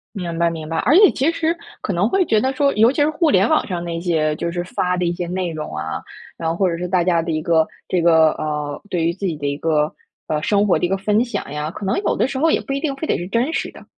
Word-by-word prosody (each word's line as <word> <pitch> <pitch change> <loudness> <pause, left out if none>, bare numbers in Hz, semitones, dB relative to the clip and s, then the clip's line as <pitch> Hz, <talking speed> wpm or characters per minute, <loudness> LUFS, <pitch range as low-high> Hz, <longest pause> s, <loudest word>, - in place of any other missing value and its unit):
明 170 -3 -4
白 170 0 +3
明 160 -2 -6
白， 165 - -3
而 255 - +3
且 405 0 +7
其 285 +5 +1
实 330 0 0 0.3
可 200 - -2
能 195 +6 +1
会 385 -1 +2
觉 220 -7 +3
得 265 +1 0
说， 280 +1 +2
尤 225 +3 +5
其 290 - -1
是 300 - +4
互 315 0 +1
联 195 -4 +4
网 - - +2
上 175 -3 -3
那 170 -1 -4
些， 155 -3 +1
就 170 - -2
是 175 0 -3
发 180 0 -1
的 180 - 0
一 170 - 0
些 175 0 -4
内 180 0 -2
容 155 - -6
啊， 80 +1 -4 0.4
然 165 -1 -2
后 165 - -1
或 190 +1 +2
者 170 - -2
是 180 +1 -3
大 175 -1 +2
家 170 -2 +2
的 165 - -3
一 155 - -1
个 160 -1 +2 0.2
这 180 - 0
个 160 -2 +5
呃， 150 -1 -4
对 170 -3 -1
于 170 - +1
自 195 +3 -5
己 165 - -2
的 145 -1 -6
一 140 0 -2
个， 150 -1 0 0.3
呃， 150 -1 -1
生 205 +4 +2
活 190 - +2
的 - - +1
一 175 - -2
个 195 - +1
分 210 +3 +2
享 240 - -5
呀， 150 +1 -3
可 200 - -7
能 195 - 0
有 - - +1
的 - - +1
时 265 -1 -4
候 325 +2 +3
也 - - +2
不 275 - -4
一 275 - -1
定 285 -2 -2
非 295 +4 -4
得 - - +1
是 175 - -5
真 235 +8 0
实 - - -2
的。 - - -14
175 Hz, 330 characters per minute, -20 LUFS, 160-230 Hz, 0.4 s, 且